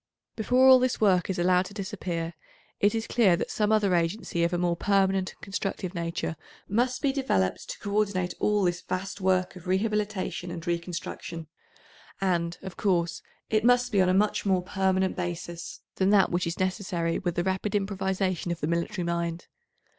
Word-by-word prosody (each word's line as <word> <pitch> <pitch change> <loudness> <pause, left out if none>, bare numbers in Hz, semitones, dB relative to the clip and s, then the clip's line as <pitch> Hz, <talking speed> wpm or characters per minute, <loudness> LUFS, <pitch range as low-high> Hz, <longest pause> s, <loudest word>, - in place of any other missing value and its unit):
Before 250 +4 +4
all 260 -1 +9
this 255 0 0
work 190 -4 +3
is 190 - -1
allowed 180 +1 +3
to 200 - -13
disappear 185 -5 -4 0.5
it 205 +2 +3
is 225 0 -1
clear 210 -8 +4
that - - -3
some 210 0 +1
other 210 -3 +3
agency 170 0 0
of 170 - +2
a 175 - 0
more 175 -1 +1
permanent 195 0 +2
and - - -32
constructive 195 -2 -3
nature 170 -2 -3 0.3
must 245 +7 0
be 275 -2 +2
developed 175 - 0
to - - -5
co 200 - -6
ordinate 185 -4 0
all 210 -1 +2
this 175 0 0
vast 195 +2 -4
work 185 -1 +1
of 180 0 -11
rehabilitation 205 -2 -1
and 170 0 -6
reconstruction, 170 -1 -4 0.7
and, 175 -3 0
of 190 -2 -8
course, 175 -4 0 0.3
it 215 -1 +2
must 245 +1 +4
be 200 -3 +4
on 185 - +3
a - - +3
much 210 +1 +2
more 190 -3 +2
permanent 190 0 +1
basis 175 -1 -5 0.2
than 190 0 +3
that 200 -2 +4
which 175 0 0
is 170 - -3
necessary 185 -3 -1
with 175 -2 -2
the 175 - 0
rapid 190 +2 -1
improvisation 190 -3 -1
of 170 - -3
the - - -1
military 170 +4 -1
mind. 170 0 -2
185 Hz, 185 wpm, -27 LUFS, 175-205 Hz, 0.7 s, all